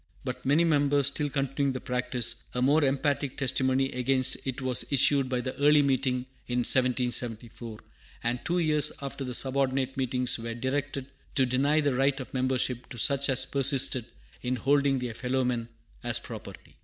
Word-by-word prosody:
But - - -5
many 150 +5 +4
members 145 -3 +2
still 145 +1 0
continuing 135 0 -1
the 130 - -4
practice, 125 -1 -2
a 125 - 0
more 145 +4 +4
emphatic 140 0 0
testimony 135 0 +1
against 130 +1 +1
it 130 -2 -3
was 130 -2 -1
issued 140 -1 +4
by 125 -1 -1
the 130 +1 -4
Yearly 145 0 +5
Meeting 130 -2 0 0.2
in 125 0 0
1774; 120 -3 0 0.5
and 120 +1 -1
two 175 +1 0
years 150 -3 +3
after 140 0 -5
the 125 -2 -4
subordinate 135 0 0
meetings 125 -2 0
were 115 0 -5
directed 135 +2 -3 0.3
to 130 - +4
deny 140 +5 +2
the 145 -2 +1
right 135 +2 +1
of 130 - -8
membership 130 -1 -1
to 125 - -9
such 140 +4 +2
as 130 -1 +3
persisted 135 -3 +2 0.4
in 125 +1 -1
holding 140 +2 +2
their 125 -2 -4
fellow 130 +3 -1
men 120 -2 -2 0.3
as 120 -1 0
property. - - -10
130 Hz, 170 wpm, -28 LUFS, 125-140 Hz, 0.5 s, Yearly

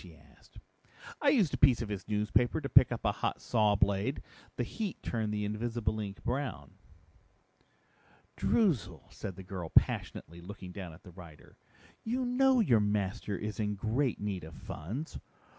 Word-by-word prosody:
she - - -13
asked. - - -21 0.6
"I 290 - +5
used 225 - +3
a - - 0
piece 125 -4 +5
of 105 - -6
his 100 -2 -5
newspaper 105 +6 +1
to 140 - -4
pick 130 - +7
up 120 -2 -4
a 105 - +4
hot - - -2
saw 105 -3 +2
blade. 100 +6 +1 0.3
The 125 - -1
heat 205 - -4
turned 110 -3 -1
the 105 0 -1
invisible 110 0 -2
ink 100 -2 -6
brown." 120 - -3 1.6
"Droozle," 185 - +1
said 95 -3 -6
the 95 - -9
girl 90 -3 -6
passionately, 85 +2 +1
looking 95 0 -9
down 90 -2 -7
at 85 - -16
the 90 - -12
writer, 85 -4 -14 0.5
"you 250 +3 -1
know 260 +1 +4
your 120 - +4
master 105 -1 -1
is 105 +3 -5
in 105 -1 0
great 115 +6 0
need 100 -3 -3
of 80 - -10
funds. 110 - -6
105 Hz, 165 wpm, -32 LUFS, 100-125 Hz, 1.6 s, pick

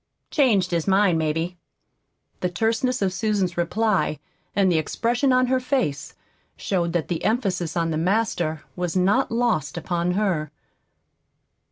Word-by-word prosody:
"Changed 215 - +3
his 170 0 -1
mind, 190 -3 +3
maybe." 160 +3 -2 0.8
The 180 - -1
terseness 225 +5 0
of 190 -1 0
Susan's 200 -4 0
reply 190 -1 0 0.4
and 195 -2 +3
the 165 - +3
expression 240 - 0
on 255 0 +4
her 260 +1 +1
face 250 - -2 0.4
showed 170 -3 -1
that 170 -3 0
the 170 -3 -3
emphasis 185 -8 0
on 165 -1 0
the 155 - -1
"Master" 175 -4 0
was 180 -1 -3
not 200 +9 +2
lost 230 - 0
upon 175 0 -1
her. 180 -7 0
185 Hz, 140 wpm, -23 LUFS, 170-225 Hz, 0.8 s, on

